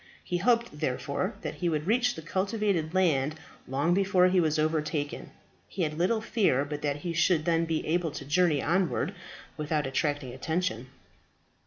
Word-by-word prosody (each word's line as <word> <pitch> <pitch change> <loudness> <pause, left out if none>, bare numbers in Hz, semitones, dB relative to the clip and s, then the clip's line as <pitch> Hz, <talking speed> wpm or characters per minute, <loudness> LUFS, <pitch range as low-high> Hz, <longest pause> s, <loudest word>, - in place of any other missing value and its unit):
He 180 - -2
hoped, 235 +5 +1
therefore, - - -2
that - - -4
he 175 - -1
would 155 -2 -1
reach 245 +4 +2
the 160 - -8
cultivated 190 -2 -1
land 155 -5 +2 0.3
long 145 +6 +1
before 190 -1 +4
he 185 0 +3
was 155 -2 +2
overtaken. 155 -1 -1 0.4
He 180 - -3
had 155 0 -2
little 220 +6 +2
fear 190 - +1
but 145 0 -5
that 145 -2 0
he 170 +1 -3
should 165 -1 +2
then 165 -1 +2
be 160 -1 -2
able 170 +1 +1
to 140 - -7
journey 155 -1 +2
onward 185 +1 +1 0.4
without 150 -1 -1
attracting 135 -1 -1
attention. 160 -2 -2
165 Hz, 165 wpm, -28 LUFS, 150-185 Hz, 0.4 s, before